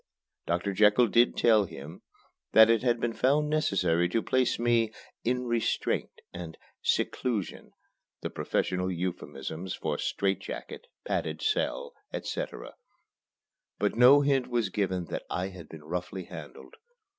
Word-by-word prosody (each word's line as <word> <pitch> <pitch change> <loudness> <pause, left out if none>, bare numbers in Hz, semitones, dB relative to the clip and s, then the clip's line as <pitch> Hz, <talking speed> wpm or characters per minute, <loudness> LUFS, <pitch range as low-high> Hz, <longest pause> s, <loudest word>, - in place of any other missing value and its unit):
Doctor 90 +4 0
Jekyll 105 +4 +5
did 120 +3 +3
tell 110 -3 +5
him 80 0 -10 0.5
that 110 +1 +8
it 115 -2 +3
had 120 -2 +1
been 115 0 -1
found 150 +5 +2
necessary 90 - +2
to 115 +5 0
place 130 -1 +1
me 115 -2 +2 0.3
in 125 +1 0
"restraint" 120 -2 -1
and 85 -2 -7 0.2
"seclusion" 115 -7 -1 0.5
(the - - -4
professional 90 0 -1
euphemisms 85 -1 -4
for 75 -2 -3
"strait 95 -1 0
jacket," 480 - -8 0.2
"padded - - -2
cell," 480 +3 -1 0.2
etc.), - - -5 1.0
but - - 0
no 130 +4 +7
hint 135 -3 +2
was 120 -5 0
given 95 -3 -1
that - - -4
I 90 +2 -2
had 90 -4 -11
been 80 -2 -11
roughly 90 +3 -4
handled. - - -11
105 Hz, 135 wpm, -29 LUFS, 90-125 Hz, 1.0 s, that